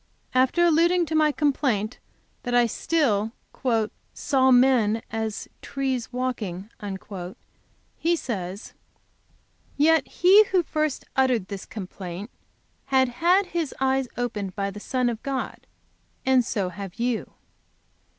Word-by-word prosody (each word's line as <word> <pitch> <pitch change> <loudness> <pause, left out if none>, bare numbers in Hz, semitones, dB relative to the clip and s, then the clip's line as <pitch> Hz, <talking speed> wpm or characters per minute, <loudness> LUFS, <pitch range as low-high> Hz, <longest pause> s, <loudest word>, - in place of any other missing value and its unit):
After 260 +7 +3
alluding 340 +2 +4
to 320 - -5
my 305 -1 +4
complaint 265 -7 0 0.4
that 245 -1 -2
I 240 0 +5
still 225 -5 0 0.8
"saw 265 -2 +2
men 245 -4 +4
as 220 -1 -3
trees 265 -4 -2
walking," 225 -6 -3 1.3
he 340 +1 +2
says: 195 - -5 1.0
"Yet 310 0 +4
he 390 +5 +6
who 370 -3 +2
first 305 -2 -2
uttered 250 -7 +2
this 200 -2 -6
complaint 190 0 -7 0.5
had 265 -2 +3
had 350 +10 +3
his 335 -5 -3
eyes 265 0 +1
opened 210 -6 -3
by 200 0 -2
the 210 - -8
Son 250 +3 0
of 230 -2 -2
God, 270 -2 -4 0.6
and 260 -1 +4
so 200 -5 -1
have 195 0 -8
you. 240 -1 -2
255 Hz, 120 wpm, -25 LUFS, 215-295 Hz, 1.3 s, he